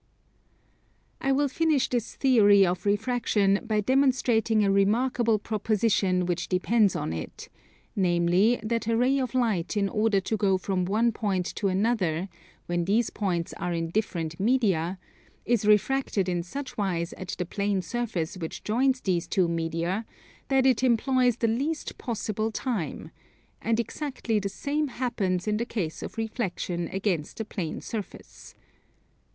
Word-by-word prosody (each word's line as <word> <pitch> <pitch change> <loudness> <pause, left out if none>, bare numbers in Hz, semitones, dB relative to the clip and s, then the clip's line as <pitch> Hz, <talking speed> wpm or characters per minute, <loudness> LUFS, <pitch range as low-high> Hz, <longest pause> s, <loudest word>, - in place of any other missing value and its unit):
I 270 - +1
will 285 +2 +2
finish 310 -1 +1
this 240 -2 -2
theory 205 -7 +5
of 180 +3 -2
refraction 205 -2 +2
by 215 -3 0
demonstrating 240 -4 +2
a 195 - +3
remarkable 225 +3 +2
proposition 205 -3 +1
which 175 0 -2
depends 200 +2 +2
on 80 - -2
it; 80 -1 -7 0.5
namely, 180 +4 +3
that 230 0 -1
a 230 0 +2
ray 260 +3 +3
of 255 -1 -3
light 220 -6 0
in 200 -1 +2
order 210 0 +2
to 195 +4 -2
go 195 -2 +2
from 185 -1 -1
one 220 +5 +2
point 195 -5 -1
to 200 - 0
another, 190 -3 0 0.4
when 175 -1 -1
these 215 +5 +1
points 175 -5 -2
are 180 - -2
in 165 -1 -2
different 170 -6 -2
media, 195 -6 +1 0.5
is 230 -3 +1
refracted 210 -2 +2
in 175 -1 0
such 255 +7 -7
wise 170 -4 -1
at 185 0 -6
the 180 - -2
plane 200 +1 -1
surface 210 -9 -3
which 165 -3 -6
joins 255 +4 +1
these 175 -3 0
two 185 -3 +2
media 170 +5 -2 0.4
that 265 -1 +3
it 255 -4 +4
employs 250 0 +3
the 230 - +1
least 280 +8 -2
possible 220 -2 -2
time: 220 - -3 0.5
and 230 0 +1
exactly 235 -2 -2
the 200 -1 -3
same 295 +8 -2
happens 215 -8 -2
in 210 0 +1
the 230 - -1
case 175 -9 -3
of - - -7
reflexion 185 -6 -3
against 185 -4 -2
a 220 - -2
plane 180 -6 -4
surface. 215 -4 -8
210 Hz, 150 wpm, -27 LUFS, 185-240 Hz, 0.5 s, theory